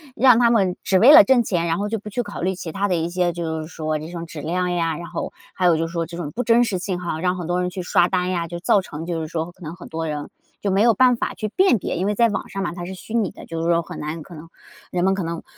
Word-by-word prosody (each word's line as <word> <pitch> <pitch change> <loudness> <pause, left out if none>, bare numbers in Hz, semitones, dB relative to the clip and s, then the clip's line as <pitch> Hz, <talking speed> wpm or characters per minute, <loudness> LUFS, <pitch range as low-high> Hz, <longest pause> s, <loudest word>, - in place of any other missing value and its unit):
让 250 -2 +6
他 235 -1 +5
们 195 -6 +2
只 190 - +3
为 245 +9 +8
了 315 0 +10
挣 260 -2 +4
钱， 175 -5 -1
然 165 0 0
后 205 +1 -2
就 225 -1 -2
不 210 - -9
去 245 +4 -2
考 205 - -8
虑 185 +2 0
其 170 -2 -6
它 200 +3 -1
的 180 - +1
一 165 +1 -1
些 175 -1 0
就 160 -2 -3
是 155 - -7
说 155 -2 -3
这 155 +2 -8
种 170 -1 -5
质 165 -2 -9
量 180 +4 -1
呀， 165 -2 0
然 170 - -7
后， - - -5 0.2
还 185 - -1
有 175 -2 +5
就 165 +1 -1
是 - - -10
说 170 -1 -2
这 170 +1 -9
种 165 -4 -5
不 245 - -3
真 235 +1 +5
实 210 -6 -1
性 180 -1 -3
哈， 170 -3 -3
让 180 +1 0
很 175 -2 -5
多 175 +1 0
人 180 0 0
去 185 0 -5
刷 175 0 +3
单 180 -1 0
呀， 170 -2 -1
就 170 +1 -7
造 200 - +4
成 165 -4 -7
就 170 -1 -2
是 160 - -4
说 165 +1 -3
可 180 - -27
能 160 +1 -7
很 180 - -12
多 160 0 -3
人 150 -1 -4 0.3
就 200 - 0
没 195 +2 +2
有 235 0 +5
办 250 +3 +4
法 - - -2
去 215 - -4
辨 370 - +3
别。 175 - -3
因 185 - -1
为 205 +1 0
在 235 +2 +4
网 205 - -3
上 195 0 -4
嘛， 175 - -3
它 175 -1 -6
是 190 - -6
虚 190 +4 -10
拟 225 -5 +1
的， - - -12
就 165 0 -5
是 165 - -1
说 170 0 +3
很 - - -9
难 155 +2 -5
可 175 - -12
能 160 +2 -11 0.4
人 175 -1 0
们 190 +1 +3
可 195 -2 -2
能 165 0 -4
180 Hz, 350 characters per minute, -22 LUFS, 165-200 Hz, 0.4 s, 了